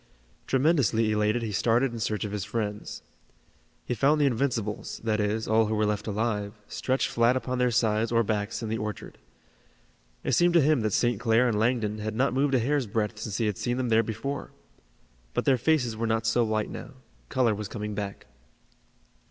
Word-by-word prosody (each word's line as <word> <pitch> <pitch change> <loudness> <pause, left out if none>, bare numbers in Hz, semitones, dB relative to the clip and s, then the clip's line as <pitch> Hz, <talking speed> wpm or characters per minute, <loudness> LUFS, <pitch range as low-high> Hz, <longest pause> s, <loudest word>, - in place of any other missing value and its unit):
Tremendously 130 - +2
elated 105 +2 +1
he 110 - -3
started 120 +5 +2
in 115 - -5
search 105 0 -1
of 105 - -5
his 105 -2 -3
friends. 105 -1 -4 0.8
He - - -1
found 140 +5 +3
the 145 - +4
Invincibles, 115 -5 -1
that 110 -2 0
is, 105 +2 -1
all 110 0 +3
who 110 - -1
were 105 0 +2
left 105 +1 -2
alive, 105 -1 -1
stretched 130 +1 -1
flat 120 +2 +2
upon 130 -1 -3
their 125 0 +3
sides 115 -1 +1
or 115 0 +3
backs 105 +1 -2
in 110 - -3
the 110 0 -2
orchard. 105 -1 -6 1.0
It - - -1
seemed 175 0 +3
to 170 - +7
him 150 -2 +3
that 110 -2 -1
St. 120 -3 +1
Clair 115 +1 +3
and 110 -3 0
Langdon 110 -2 0
had 110 +1 -4
not 130 +2 +1
moved 135 +1 +2
a - - +4
hair's 135 +1 0
breadth 105 +1 -2
since 105 -2 -4
he 115 - 0
had 105 -3 -2
seen 120 0 -1
them 130 -2 -1
there 110 0 +5
before. 115 +6 -4 0.9
But - - 0
their 130 -2 +3
faces 125 -4 +1
were 115 +1 -2
not 110 0 0
so 115 +2 +3
white 110 -1 -1
now. - - -8 0.4
Color 125 -4 +2
was 105 0 -4
coming 105 +1 -5
back. 100 -1 -5
115 Hz, 200 wpm, -27 LUFS, 105-125 Hz, 1.0 s, to